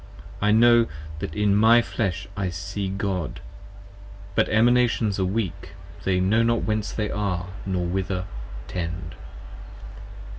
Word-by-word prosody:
I 105 - +3
know 120 +1 +6 0.3
that 80 - -5
in 105 -1 +2
my 115 +3 +6
flesh 100 -4 -2
I 100 -1 -2
shall 90 - -2
see 100 +2 -4
God: 95 -7 -3 0.9
but - - +2
Emanations 115 -2 +3
Are 95 - +2
weak, 100 -1 -3 0.3
they 95 -1 +2
know 100 +5 +3
not 115 0 +2
whence 105 -3 -1
they 105 +1 -2
are, 90 -4 -2 0.2
nor 90 -2 0
whither 95 +1 -2 0.4
tend. 85 -1 -4
100 Hz, 135 wpm, -24 LUFS, 90-110 Hz, 0.9 s, know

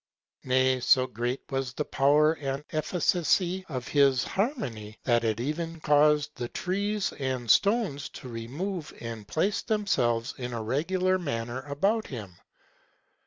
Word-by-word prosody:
Nay, 130 0 +3
so 130 +1 +4
great 120 +1 -3
was 135 -2 -2
the 150 - -2
power 150 +3 +4
and 140 -2 -4
efficacy 175 +3 +1
of 130 -5 -4
his 140 -3 +4
harmony, 125 - -3
that 120 -2 +2
it 110 -1 0
even 165 +5 -3
caused 150 0 +3
the 120 -4 -4
trees 200 +2 -1
and 130 -4 0
stones 200 - +2
to 130 - -9
remove, 145 +10 -5
and 115 -3 -7
place 175 - 0
themselves 125 - 0
in 125 -1 -4
a 115 -1 -3
regular 185 +10 +1
manner 120 -6 -3
about 200 +10 0
him. 105 -8 -7
140 Hz, 135 wpm, -28 LUFS, 120-175 Hz, -, so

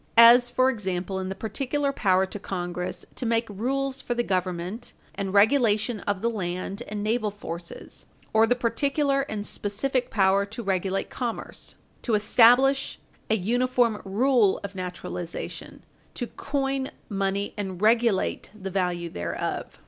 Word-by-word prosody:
As, 240 +1 +9
for 255 +2 +3
example, 190 -4 -3
in 190 0 -3
the 190 - -4
particular 275 +7 -1
power 190 -7 +2
to 200 +2 -7
Congress 180 -2 -4
"to - - -6
make 230 -1 +1
rules 265 +6 -2
for 240 - -2
the 240 - +1
government 185 +3 -3 0.2
and 195 -1 -3
regulation 220 +1 +3
of 200 -2 -2
the - - +3
land 185 0 -4
and 210 -1 -4
naval 215 0 +1
forces, 170 -4 -8 0.3
or 220 +1 +5
the 245 - +3
particular 275 +4 +1
and 210 -1 -3
specific 245 +6 -1
power 195 -1 +3
to 225 +4 -6
regulate 195 0 -1
commerce;" 240 -3 -4 0.3
"to 230 - +1
establish 245 +6 +4 0.3
an 220 -4 +1
uniform 245 0 +2
rule 215 +1 +3
of 200 0 -6
naturalization;" 180 -2 -6 0.3
"to 245 - -2
coin 270 +1 -2 0.2
money 195 0 -1
and 190 -4 -4
regulate 225 -2 +2
the 195 0 -5
value 180 -2 -1
thereof." 85 - -4
210 Hz, 140 wpm, -26 LUFS, 190-245 Hz, 0.3 s, As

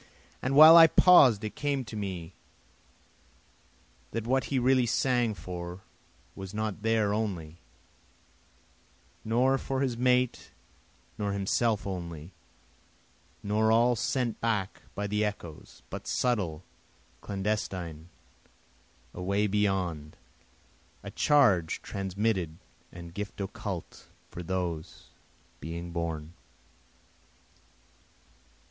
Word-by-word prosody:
And 130 +2 -1
while 155 +3 +10
I 165 -1 +10
paus'd 135 - +6
it 105 - -4
came 140 -3 -2
to 115 - -9
me 95 -4 -5 1.8
that 115 -1 -3
what 130 0 +1
he 140 - -1
really 130 0 +3
sang 120 -2 +1
for 90 -1 -7 0.5
was 95 +1 -8
not 110 -1 -3
there 110 -2 +1
only, 90 -7 -3 1.6
Nor 125 +4 +2
for 135 0 -3
his 130 -3 0
mate 125 0 +1 0.7
nor 100 -1 -1
himself 100 +2 0
only, 85 -3 -6 1.1
nor 110 +2 +2
all 120 +2 +4
sent 120 0 -2
back 105 -5 -1
by 105 - -3
the 105 +1 0
echoes, 95 -7 -6
But - - -7
subtle, 95 -11 -1 0.6
clandestine, 95 -5 -4 1.0
away 100 +3 0
beyond, 95 -7 -1 0.9
A - - -7
charge 115 - +3
transmitted 95 -4 -2 0.3
and 85 -1 -10
gift 105 +2 -6
occult 100 -2 -6 0.2
for 90 - -7
those 85 -3 -4 0.5
being 85 +1 -6
born. 85 -2 -4
105 Hz, 100 wpm, -29 LUFS, 90-115 Hz, 1.8 s, while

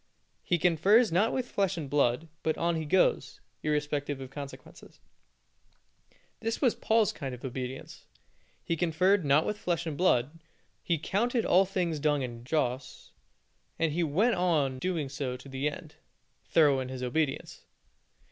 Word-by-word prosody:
He 175 - +1
confers 185 +7 +4
not 195 +7 +2
with 255 -2 -2
flesh 195 -2 0
and 155 -4 -4
blood, 140 +1 +1
but 160 - -1
on 170 0 0
he 160 -1 -3
goes, 180 +5 +1 0.2
irrespective 150 -2 -1
of 130 -1 -8
consequences. 140 0 -10 1.4
This 225 0 -2
was 250 -5 +3
Paul's 220 -2 +2
kind 135 -4 -5
of 125 - -10
obedience. 130 0 -6 0.6
He 170 - -1
conferred 180 +4 +2
not 145 +2 +3
with 210 0 -3
flesh 170 -1 -1
and 160 -3 -3
blood; 150 -3 +1 0.4
he 170 - 0
counted 230 - 0
all 190 +2 +5
things 180 -5 -2
dung 145 -2 +1
and 120 -2 -6
dross, 125 -2 -2 0.7
and 165 -2 +1
he 170 +4 -1
went 180 +10 +2
on 155 -8 +1
doing 165 -3 -1
so 135 -2 -4
to 125 - -14
the 135 +2 -1
end 145 - -10 0.5
thorough 145 -5 +4
in 130 -1 -4
his 130 -1 -6
obedience. 135 +3 -2
155 Hz, 155 wpm, -29 LUFS, 135-180 Hz, 1.4 s, all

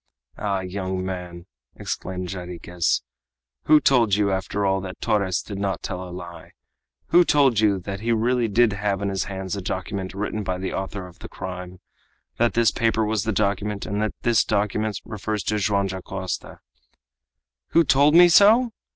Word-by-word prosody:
"Ah! 100 -2 -1
young 95 0 -4
man!" 90 -2 -6 0.3
exclaimed 90 -1 -5
Jarriquez, 90 -1 -2 0.6
"who 155 - +6
told 120 -9 +3
you, 100 -1 +1
after 95 +2 -1
all, 95 0 +1
that 95 0 -8
Torres 100 -5 0
did 100 -2 -7
not 100 -1 -2
tell 90 -1 -4
a 90 - -7
lie? 85 -2 -10 0.6
Who 175 +1 +6
told 140 -8 +3
you 105 -2 +3
that 95 +2 -5
he 115 +3 -1
really 120 +1 +1
did 110 +1 +3
have 100 -1 -1
in 100 - 0
his 95 -1 -2
hands 95 -1 -4
a 100 - -4
document 95 +1 -4
written 105 +2 -3
by 95 -1 -2
the 95 +1 -4
author 95 0 -4
of 90 - -14
the - - -9
crime? 90 -1 -7 0.6
that 120 0 +1
this 115 -1 +4
paper 115 -1 +1
was 110 -1 -1
the 110 - 0
document, 100 0 -1
and 105 0 -2
that 110 - -2
this 120 -2 +3
document 105 0 -1
refers 105 -2 -4
to 105 +3 0
Joam 100 0 +1
Dacosta?" 95 -1 -5 1.1
"Who 170 - +4
told 145 +1 +4
me 175 +1 +9
so?" 220 +7 +5
100 Hz, 175 wpm, -23 LUFS, 95-110 Hz, 1.1 s, me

